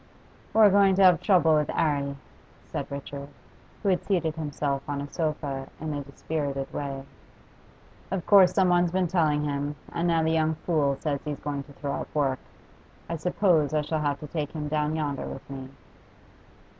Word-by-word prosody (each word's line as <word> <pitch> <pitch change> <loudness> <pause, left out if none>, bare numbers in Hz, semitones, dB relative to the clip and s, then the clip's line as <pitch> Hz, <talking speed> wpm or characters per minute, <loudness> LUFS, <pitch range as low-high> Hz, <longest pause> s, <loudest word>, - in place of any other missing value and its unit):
'We're 215 -2 +6
going 195 -1 +5
to 195 - +4
have 180 -4 +6
trouble 175 -5 +4
with 150 -1 +2
'Arry,' 140 -2 0 0.5
said - - -4
Richard, 140 0 -6 0.6
who 200 - +2
had 180 -2 +1
seated 170 -6 0
himself 145 -3 -2
on 145 -1 -2
a 140 - -4
sofa 145 -4 -3
in 155 0 -3
a 145 - -3
dispirited 140 -1 -4
way. 135 -2 -4 1.1
'Of 190 -3 -3
course 195 -3 +7
someone's 180 -2 +3
been 185 0 +1
telling 155 -4 +2
him, 145 0 -2 0.2
and 170 +1 0
now 165 -1 +3
the 160 - +2
young 160 -1 +2
fool 150 -4 0
says 145 -3 -1
he's 150 -2 -4
going 145 -1 -3
to 145 - -15
throw 140 0 -4
up - - -6
work. 135 -3 +1 0.7
I 165 - -3
suppose 160 -3 +2
I 150 - +3
shall 155 +1 -2
have 145 -1 0
to 150 - -6
take 150 -2 -4
him 150 -2 -4
down 150 0 0
yonder 145 -3 -2
with 135 - -8
me. 135 -1 -7
150 Hz, 180 wpm, -27 LUFS, 140-170 Hz, 1.1 s, course